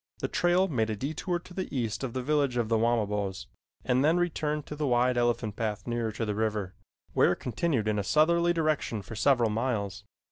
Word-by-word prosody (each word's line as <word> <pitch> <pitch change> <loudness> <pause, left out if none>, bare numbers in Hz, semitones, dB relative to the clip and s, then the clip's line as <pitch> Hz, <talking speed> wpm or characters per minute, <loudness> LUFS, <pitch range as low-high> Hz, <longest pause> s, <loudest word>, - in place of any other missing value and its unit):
The - - -2
trail 175 +2 +2
made 115 -9 0
a 110 - -1
detour 155 - -2
to 175 +1 -13
the 185 0 -4
east 115 0 -2
of 125 -3 -3
the 130 - -3
village 140 -3 +1
of 115 -2 0
the 115 - +3
Wamabos, 105 -4 0 0.4
and 130 +1 +2
then 160 +4 +4
returned 150 -4 -1
to 150 - -7
the 150 -1 -1
wide 125 0 +3
elephant 120 -3 0
path 110 -2 -3
nearer 120 -2 -1
to 115 +1 -2
the 105 - -1
river, 105 -3 -1 0.4
where - - +4
it - - -8
continued 125 -2 -1
in 105 -1 +1
a - - -1
southerly 170 - +3
direction 155 -10 0
for 110 - -9
several 120 -1 +3
miles. 105 -4 -2
120 Hz, 210 wpm, -28 LUFS, 110-150 Hz, 0.4 s, then